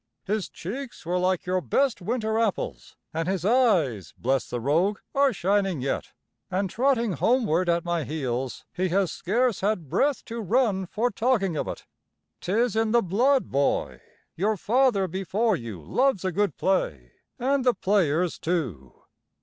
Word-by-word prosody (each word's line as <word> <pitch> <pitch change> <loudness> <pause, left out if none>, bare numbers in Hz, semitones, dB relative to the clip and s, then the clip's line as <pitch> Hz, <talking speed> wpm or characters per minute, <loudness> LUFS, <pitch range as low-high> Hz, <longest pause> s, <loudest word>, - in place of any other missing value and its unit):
His 205 -2 -1
cheeks 240 +4 -7
were 180 +2 0
like 185 0 0
your 185 0 0
best 270 +2 +1
winter 220 +2 -1
apples, 220 -4 -2 0.2
an' 165 +1 -2
his 185 -2 -1
eyes, 185 - +2
bless 130 -1 0
the 120 - -3
rogue, 165 - +1 0.2
are 280 -1 +4
shining 195 - 0
yet. 135 +2 -3 0.4
An' 190 +1 -1
trotting 235 0 +1
homeward 185 - +2
at 170 0 +1
my 170 -2 0
heels, 130 -3 -3
he 185 +1 -1
has 185 -1 +1
scarce 235 +3 0
had 190 -7 -1
breath 285 - +1
to 230 0 -5
run 210 -3 +1
for 230 +7 0
talking 210 -6 +1
of - - -2
it. - - -6 0.5
'Tis 220 +4 0
in 220 0 +1
the 235 - +4
blood, 250 +9 +2
boy; 140 +1 0 0.3
your 210 +5 0
father 230 -2 +2
before 195 +5 0
you 115 - -7
loves 245 - +1
a 185 - +1
good 205 +3 0
play, 75 - -1 0.3
an' 270 +2 +1
the 250 -1 +3
players, 180 -4 +1
too." 120 - -3
190 Hz, 160 wpm, -26 LUFS, 165-230 Hz, 0.5 s, are